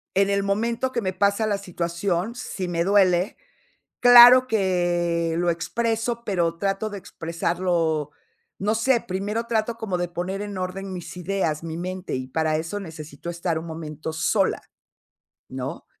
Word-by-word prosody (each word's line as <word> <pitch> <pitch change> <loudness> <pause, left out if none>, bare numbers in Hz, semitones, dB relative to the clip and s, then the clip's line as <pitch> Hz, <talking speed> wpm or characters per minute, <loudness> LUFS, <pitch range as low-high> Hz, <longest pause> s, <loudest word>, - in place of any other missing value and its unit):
en 195 +1 +3
el 200 0 +1
momento 230 +6 0
que 245 -2 -1
me 190 -3 -1
pasa 200 +3 +1
la 205 -2 +1
situación, 180 +2 -2
si 195 -6 -5
me 170 -1 0
duele, 190 -1 +3 0.7
claro 245 +1 +9
que 175 -6 +1
lo 175 0 +2
expreso, 225 +7 -1
pero 170 -5 0
trato 195 +3 -1
de 205 - -6
expresarlo, 165 -3 -1 0.5
no 210 +3 0
sé 235 +2 +2
primero 205 +5 -3
trato 230 0 0
como 215 -6 -3
de 175 0 -1
poner 180 +3 -4
en 205 -1 -6
orden 185 +1 -4
mis 180 -1 -7
ideas, 180 -4 -1
mi 160 -1 -5
mente 185 +1 -4
y 130 0 -4
para 155 +2 0
eso 165 +6 -3
necesito 160 -3 -9
estar 170 -1 -2
un 160 - -7
momento 160 -1 -6
sola, 185 +5 +1 0.9
¿no?, - - -6
185 Hz, 155 wpm, -24 LUFS, 170-205 Hz, 0.9 s, claro